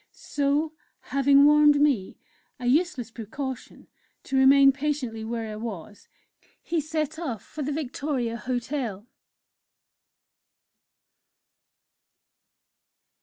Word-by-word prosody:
So, 290 Hz, +2 st, -1 dB, 0.4 s
having 275 Hz, +1 st, +5 dB
warned 295 Hz, 0 st, +6 dB
me 275 Hz, -10 st, +1 dB, 0.4 s
a 250 Hz, -, -6 dB
useless 260 Hz, -3 st, +1 dB
precaution 250 Hz, +4 st, -7 dB, 0.4 s
to 270 Hz, -, -4 dB
remain 275 Hz, +1 st, +7 dB
patiently 270 Hz, -5 st, -3 dB
where 225 Hz, -1 st, -4 dB
I -, -, -6 dB
was, 210 Hz, -3 st, -8 dB, 0.6 s
he 335 Hz, -2 st, -1 dB
set 310 Hz, 0 st, -3 dB
off 255 Hz, -, -4 dB
for 305 Hz, -, -8 dB
the 290 Hz, +1 st, -2 dB
Victoria 275 Hz, -4 st, -3 dB
Hotel. 245 Hz, -4 st, -4 dB
275 Hz, 90 wpm, -26 LUFS, 235-295 Hz, 0.6 s, remain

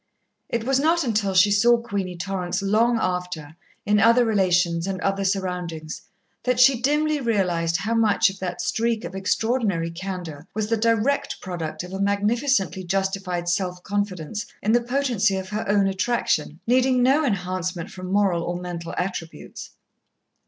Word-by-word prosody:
It 235 Hz, -1 st, -1 dB
was 265 Hz, +2 st, +2 dB
not 330 Hz, +3 st, +2 dB
until 210 Hz, -5 st, 0 dB
she 195 Hz, +3 st, +6 dB
saw 235 Hz, +4 st, +5 dB
Queenie 200 Hz, -6 st, -4 dB
Torrance 185 Hz, +1 st, -3 dB
long 225 Hz, +4 st, +3 dB
after, 180 Hz, -5 st, -3 dB, 0.3 s
in 210 Hz, 0 st, +3 dB
other 230 Hz, +3 st, +5 dB
relations 180 Hz, -5 st, +2 dB
and 190 Hz, -1 st, -3 dB
other 195 Hz, 0 st, 0 dB
surroundings, 180 Hz, -5 st, -3 dB, 0.4 s
that 250 Hz, -1 st, 0 dB
she 250 Hz, -1 st, +5 dB
dimly 300 Hz, +3 st, +1 dB
realized 180 Hz, -8 st, +1 dB
how 220 Hz, +7 st, -2 dB
much 220 Hz, -3 st, +3 dB
of 195 Hz, -, -13 dB
that 180 Hz, -1 st, -4 dB
streak 230 Hz, 0 st, 0 dB
of -, -, -7 dB
extraordinary 195 Hz, -3 st, 0 dB
candour 175 Hz, -3 st, -6 dB
was 215 Hz, 0 st, -2 dB
the 230 Hz, -, +3 dB
direct 230 Hz, +5 st, +1 dB
product 165 Hz, -3 st, -5 dB
of 180 Hz, +1 st, -9 dB
a 195 Hz, -, -3 dB
magnificently 200 Hz, -, +1 dB
justified 190 Hz, -1 st, -2 dB
self 180 Hz, 0 st, -1 dB
confidence 205 Hz, -1 st, -3 dB, 0.2 s
in 215 Hz, -, +2 dB
the 240 Hz, +1 st, +4 dB
potency 240 Hz, -6 st, +1 dB
of 190 Hz, 0 st, -5 dB
her 210 Hz, -1 st, -3 dB
own 200 Hz, -1 st, +3 dB
attraction, 190 Hz, -6 st, 0 dB
needing 255 Hz, +1 st, +3 dB
no 275 Hz, +5 st, +4 dB
enhancement 185 Hz, -, -2 dB
from 185 Hz, 0 st, -7 dB
moral 195 Hz, -4 st, +2 dB
or 175 Hz, +1 st, -3 dB
mental 175 Hz, -2 st, -6 dB
attributes. 180 Hz, -3 st, -5 dB
195 Hz, 155 wpm, -23 LUFS, 180-230 Hz, 0.4 s, she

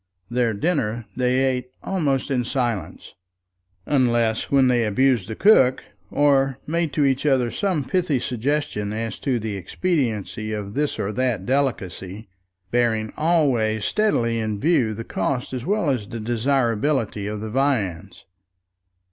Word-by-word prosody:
Their 120 Hz, -3 st, +1 dB
dinner 120 Hz, -, -1 dB
they 125 Hz, +1 st, +1 dB
ate 125 Hz, -1 st, -1 dB
almost 145 Hz, -7 st, -1 dB
in 125 Hz, -2 st, +1 dB
silence, 120 Hz, -, -3 dB, 0.7 s
unless 120 Hz, -5 st, +1 dB
when 135 Hz, -2 st, +4 dB
they 120 Hz, -2 st, +3 dB
abused 115 Hz, -1 st, +2 dB
the 110 Hz, -, -5 dB
cook, 130 Hz, -, +4 dB, 0.3 s
or 135 Hz, -2 st, +2 dB
made 165 Hz, 0 st, -1 dB
to 145 Hz, -1 st, +2 dB
each 135 Hz, -1 st, +1 dB
other 130 Hz, -5 st, +2 dB
some 185 Hz, -7 st, -1 dB
pithy 175 Hz, -2 st, 0 dB
suggestion 125 Hz, -4 st, -2 dB
as 115 Hz, -1 st, -4 dB
to 130 Hz, -3 st, 0 dB
the 110 Hz, -2 st, -4 dB
expediency 110 Hz, -, -2 dB
of 105 Hz, -1 st, -5 dB
this 150 Hz, +3 st, -1 dB
or 100 Hz, -, -2 dB
that 125 Hz, +1 st, -1 dB
delicacy, 110 Hz, -, -2 dB, 0.4 s
bearing 115 Hz, -3 st, +1 dB
always 130 Hz, -10 st, +2 dB
steadily 115 Hz, -, +1 dB
in 110 Hz, -2 st, -2 dB
view 125 Hz, -7 st, +2 dB
the 115 Hz, -, -5 dB
cost 125 Hz, +6 st, -2 dB
as 125 Hz, +3 st, -4 dB
well 200 Hz, -7 st, +1 dB
as 115 Hz, -6 st, -2 dB
desirability 115 Hz, -1 st, 0 dB
of 105 Hz, 0 st, -4 dB
the 110 Hz, 0 st, -5 dB
viands. 115 Hz, -, -1 dB
125 Hz, 140 wpm, -23 LUFS, 110-140 Hz, 0.7 s, when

